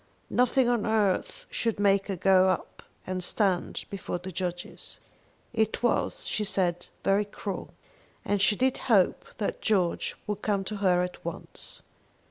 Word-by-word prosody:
Nothing 250 +1 +3
on 240 -3 +2
earth 210 -4 +1
should 230 -3 -1
make 200 -1 +3
her 195 - -1
go 185 +1 +5
up 185 - -2 0.2
and 185 -1 -2
stand 190 -1 0
before 195 -2 -3
the 185 +2 -7
judges. 175 0 -5 0.5
It 220 0 0
was, 240 - +1
she 215 - -1
said, 175 -3 0 0.2
very 200 +1 +3
cruel, 200 -1 -6 0.5
and 205 -1 +1
she 205 +1 +4
did 260 +3 +2
hope 200 -6 +4
that 205 - -2
George 185 -6 +1
would 210 -1 -3
come 200 -2 +1
to 210 +2 -4
her 180 -3 +3
at 180 0 -6
once. - - -6
195 Hz, 150 wpm, -28 LUFS, 185-215 Hz, 0.5 s, go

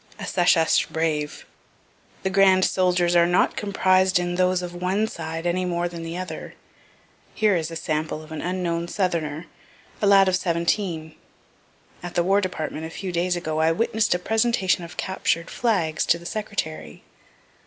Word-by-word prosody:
A - - -6
SECESH 170 -2 +3
BRAVE 155 -2 -2 0.8
The 190 - -1
grand 190 -1 +5
soldiers 180 -2 +2
are 170 0 +5
not 175 +1 +2
comprised 190 -2 +2
in 175 0 -1
those 180 0 +1
of 175 0 -6
one 185 +5 0
side, 165 -2 -6
any 175 +1 0
more 175 -1 -1
than 170 -1 -7
the 165 +1 -5
other. 180 -4 -7 0.8
Here 215 -3 +3
is 165 -2 -1
a 165 - -7
sample 155 0 -3
of 155 - -15
an 160 - -5
unknown 175 -2 -2
southerner, 170 -5 -2 0.6
a 205 - +3
lad 195 -1 +6
of 185 - +3
seventeen. 170 -2 -1 0.9
At 175 0 -7
the 175 - +3
War 195 +3 +3
department, 160 -4 -4
a - - -9
few 185 +3 -5
days 175 +1 0
ago, 160 -3 -3
I 160 +1 +3
witness'd 220 +2 +1
a - - +1
presentation 210 -2 +1
of 165 -2 -10
captured 180 -3 -1
flags 185 -10 0
to 170 - +4
the 170 - -14
Secretary. 170 - -5
175 Hz, 165 wpm, -24 LUFS, 165-190 Hz, 0.9 s, lad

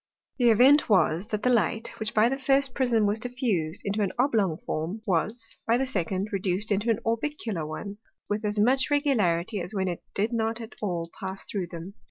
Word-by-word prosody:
The 240 -1 +5
Event 255 +7 +6
was, 180 -1 +3
that 215 -2 -3
the 250 - +3
Light, 225 0 +1
which 215 -1 -3
by 215 +1 +5
the 270 +3 -1
first 270 0 +2
Prism 235 -5 +2
was 205 +2 +1
diffused 220 - -2
into 205 +1 -1
an 195 -3 +1
oblong 220 - +2
Form, 165 +8 -3
was, 215 +6 -1
by 230 +1 +4
the 265 - 0
second, 195 -3 -2
reduc'd 195 +1 -1
into 205 +3 +1
an 225 - +3
orbicular 225 - -2
one, 200 +6 -6 0.3
with 210 +1 -2
as 210 0 -1
much 255 +6 +3
regularity, 215 - +1
as 180 +5 -6
when 190 -1 0
it 175 -2 -3
did 215 +4 0
not 225 0 0
at 225 -1 -8
all 175 -5 -2
pass 190 0 -5
through 190 -4 -3
them. 170 +2 -8
215 Hz, 200 wpm, -27 LUFS, 190-235 Hz, 0.3 s, Event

